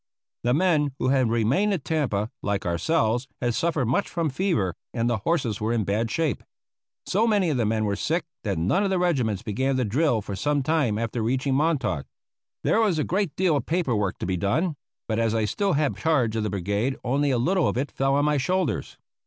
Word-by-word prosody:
The 125 +2 +2
men 155 -5 +2
who - - 0
had 130 -3 +3
remained 120 - +2
at 170 -8 -3
Tampa, 120 -10 -1
like 100 -1 -2
ourselves, 115 - +1
had 120 -1 0
suffered 155 -1 0
much 130 - 0
from 165 -4 -1
fever, 130 - 0 0.2
and 115 -1 +1
the 120 -2 +1
horses 115 - -1
were 110 +2 0
in 115 -2 +1
bad 110 +4 -1
shape. 155 -1 -1 0.6
So 215 +5 +2
many 200 -7 +2
of 140 - 0
the 115 -3 +1
men 110 0 0
were 100 -1 0
sick 165 - -1 0.2
that 100 -4 -1
none 95 - +1
of 200 - +1
the 190 - +1
regiments 130 - 0
began 130 +5 0
to 130 - +1
drill 120 0 +1
for 100 - -5
some 145 +5 0
time 140 -8 +1
after 115 +1 -2
reaching 130 +4 0
Montauk. 140 - 0 0.6
There 225 - +3
was 200 -7 +2
a 155 - +1
great 190 -4 -1
deal 180 -4 +2
of 140 - -2
paper 160 -8 0
work 100 -3 -1
to - - -4
be 95 0 -1
done; 150 - 0 0.3
but 110 0 -1
as 115 -1 +1
I 110 -1 +1
still 195 - 0
had 145 -1 0
charge 135 -9 +1
of 110 - 0
the 105 - -1
brigade 100 +7 -1
only 140 +3 +1
a 130 - +2
little 175 +8 +2
of - - -1
it 135 +2 -2
fell 135 0 +1
on 145 +1 +2
my 150 0 +2
shoulders. 180 +4 -1
130 Hz, 220 wpm, -25 LUFS, 110-160 Hz, 0.6 s, had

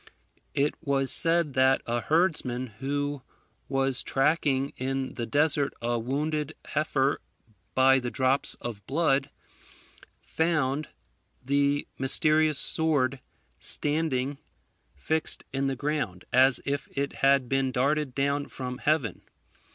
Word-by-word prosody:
It 145 +1 +2
was 135 -3 0
said 165 -3 +3
that 130 +1 +3
a 120 0 -1
herdsman, 150 -7 +1
who 145 +1 -2 0.5
was 135 -1 +1
tracking 140 -1 +1
in 135 0 -3
the 120 -1 -4
desert 145 -1 +1
a 120 0 -1
wounded 150 +5 -2
heifer 145 -2 0 0.5
by 135 0 +5
the 125 -1 -3
drops 130 +2 +1
of 110 -4 -7
blood, 135 -2 +1 0.9
found 155 -3 -1 0.5
the 140 +2 +1
mysterious 155 +2 +3
sword 140 -6 +2 0.4
standing 145 -3 -1 0.6
fixed 155 - -2
in 135 0 0
the 135 - -1
ground, 140 -10 -3
as 130 0 +5
if 140 -1 -2
it 140 0 -2
had 135 -2 +4
been 135 0 0
darted 140 +1 0
down 140 +1 0
from 125 -1 -6
heaven. 150 -6 0
140 Hz, 115 wpm, -27 LUFS, 130-150 Hz, 0.9 s, by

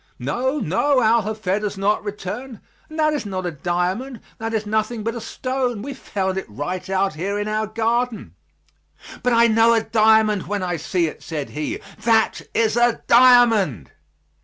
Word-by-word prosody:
"No, 260 +4 -1
no; 260 - +1
Al 225 +1 +4
Hafed 210 -1 -2
has 205 -1 -3
not 205 +2 +1
returned 210 +4 -6 0.3
and 310 - -9
that 305 -1 +2
is 295 - -2
not 190 -3 -4
a 175 - -2
diamond; 180 - -2 0.2
that 225 0 -3
is 220 -1 -2
nothing 215 +1 -1
but 230 +1 -2
a 235 - -6
stone; 255 -4 -3
we 280 +2 -5
found 190 -7 -3
it - - -10
right 180 - -5
out 195 -1 +1
here 190 +6 -3
in 205 0 -2
our 215 0 -1
garden." 230 - -1 0.9
"But 250 0 +1
I 230 0 +5
know 225 +1 +4
a 225 - +1
diamond 220 -3 +3
when 205 0 -2
I 175 -1 -2
see 170 +2 0
it," 155 - -6
said 150 -4 -5
he; 150 0 -3 0.2
"that 225 -1 +2
is 225 -1 +2
a 240 -1 +2
diamond!" 230 - +5
215 Hz, 180 wpm, -21 LUFS, 190-235 Hz, 0.9 s, I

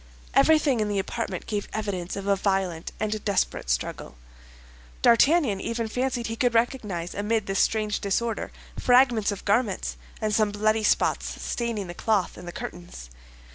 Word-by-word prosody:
Everything 305 -6 +4
in 210 -1 0
the 205 - -1
apartment 230 +4 -3
gave 205 -2 -3
evidence 195 -5 -3
of 195 -1 -5
a 200 0 +3
violent 190 -4 -1
and 215 0 -2
desperate 200 - 0
struggle. 65 0 -2 0.9
D'Artagnan 235 - +4
even 230 -1 -2
fancied 250 +1 -1
he 225 - -3
could 245 0 +1
recognize 210 -8 0
amid 210 +1 0
this 195 0 -1
strange 215 -1 +1
disorder, 225 +3 -1 0.3
fragments 245 -4 +4
of 200 - -7
garments, 200 - 0 0.2
and 215 -1 -1
some 215 0 +3
bloody 215 +1 +1
spots - - +1
staining 235 -4 -2
the 175 - -7
cloth 210 +1 0
and - - -10
the - - -4
curtains. 175 - -8
210 Hz, 155 wpm, -26 LUFS, 195-230 Hz, 0.9 s, Everything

